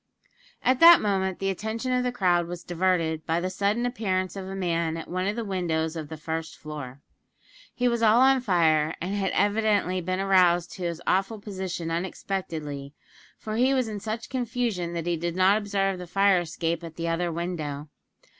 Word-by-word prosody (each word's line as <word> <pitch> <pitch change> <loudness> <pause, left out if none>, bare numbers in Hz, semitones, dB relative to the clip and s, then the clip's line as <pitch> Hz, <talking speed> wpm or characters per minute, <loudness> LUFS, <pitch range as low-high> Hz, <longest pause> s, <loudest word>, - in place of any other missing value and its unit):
At 255 0 +3
that 340 +1 +10
moment 190 -3 0
the 195 0 -1
attention 220 +6 -3
of 250 0 +2
the 250 - 0
crowd 180 -7 +2
was 175 0 -7
diverted 170 -3 0
by 165 +1 +1
the 185 +1 -2
sudden 205 +5 0
appearance 190 -7 -1
of 190 -1 -6
a 195 - -6
man 170 -3 -1
at 165 - -7
one 185 +2 -2
of 205 - -1
the 235 -1 -3
windows 170 -4 -1
of 155 -3 -6
the 160 - -7
first 160 +1 -5
floor. 140 -3 -8 0.7
He 250 - +1
was 235 -1 0
all 225 +1 +5
on 265 0 +5
fire, 160 -7 +2
and 185 +4 -3
had 195 -2 0
evidently 205 -2 +1
been 185 +2 -2
aroused 180 -3 +3
to 185 - -7
his 170 0 -4
awful 195 +4 +1
position 190 -5 -5
unexpectedly, 160 -5 -4 0.4
for 215 0 -5
he 260 +3 +3
was 255 -3 +1
in 210 -2 -5
such 220 +2 -4
confusion 235 -8 -2
that 170 -1 -3
he 175 -1 0
did 170 +1 -3
not 190 +3 +4
observe 195 -2 -1
the 180 - -7
fire 195 +1 +3
escape 170 0 -3
at 165 -1 -8
the 170 0 -3
other 170 +1 0
window. 160 -4 -4
185 Hz, 190 wpm, -26 LUFS, 170-205 Hz, 0.7 s, that